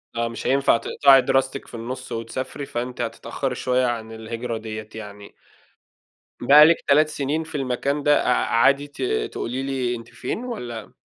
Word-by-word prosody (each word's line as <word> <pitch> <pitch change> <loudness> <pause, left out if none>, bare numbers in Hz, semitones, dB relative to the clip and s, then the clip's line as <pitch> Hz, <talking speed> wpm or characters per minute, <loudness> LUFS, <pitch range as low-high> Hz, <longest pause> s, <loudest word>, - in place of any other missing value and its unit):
آه. 115 0 0
مش 115 - -6
هينفع 135 -3 +3
تقطعي 135 +2 +5
دراستِك 135 +1 0
في - - -16
النُص 120 +3 -6
وتسافري 130 +5 -5
فأنتِ 125 0 -4
هتتأخّري 120 +3 -3
شوية 125 0 +1
عن 115 -2 -3
الهجرة 115 +1 -5
ديّة 110 -1 -7
يعني. 105 -2 -10 1.1
بقى 145 +5 +8
لِك 165 +1 +5
3 150 +2 +5
سنين 150 +2 -2
في 160 0 -10
المكان 140 +2 -1
ده 145 0 +3
أع 125 - +4
عادي 140 +5 +3
ت 145 - -12 0.3
تقولي 125 +3 -4
لي 130 -3 -1
أنتِ 115 -1 -10
فين 240 - -5
والّا؟ 120 - -6
125 Hz, 165 wpm, -23 LUFS, 115-140 Hz, 1.1 s, بقى